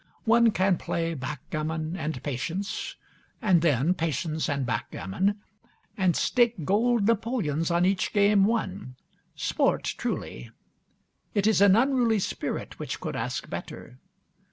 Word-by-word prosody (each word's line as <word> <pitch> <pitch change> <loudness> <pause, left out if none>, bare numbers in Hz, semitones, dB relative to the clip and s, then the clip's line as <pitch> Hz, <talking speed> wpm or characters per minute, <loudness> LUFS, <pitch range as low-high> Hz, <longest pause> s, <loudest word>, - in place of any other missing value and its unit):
One 235 0 +5
can 190 -4 +2
play 165 0 -2
backgammon 155 +3 -4
and 155 -6 -4
patience, 165 +9 -3 0.4
and 185 -6 +3
then 155 +1 +3
patience 160 -1 -2
and 140 -2 -1
backgammon, 125 - -2 0.6
and 185 -3 +2
stake 235 - +2
gold 225 +3 +2
napoleons 210 - 0
on 170 +1 +2
each 190 0 +1
game 205 -1 +4
won. 200 - -2 0.4
Sport - - +1 0.2
truly! - - -4 0.9
It 205 -1 +2
is 220 -2 +3
an 200 -1 +7
unruly 245 -2 +3
spirit 195 - -4
which - - -4
could - - -4
ask - - -3
better. 65 - -8
185 Hz, 125 wpm, -27 LUFS, 155-210 Hz, 0.9 s, an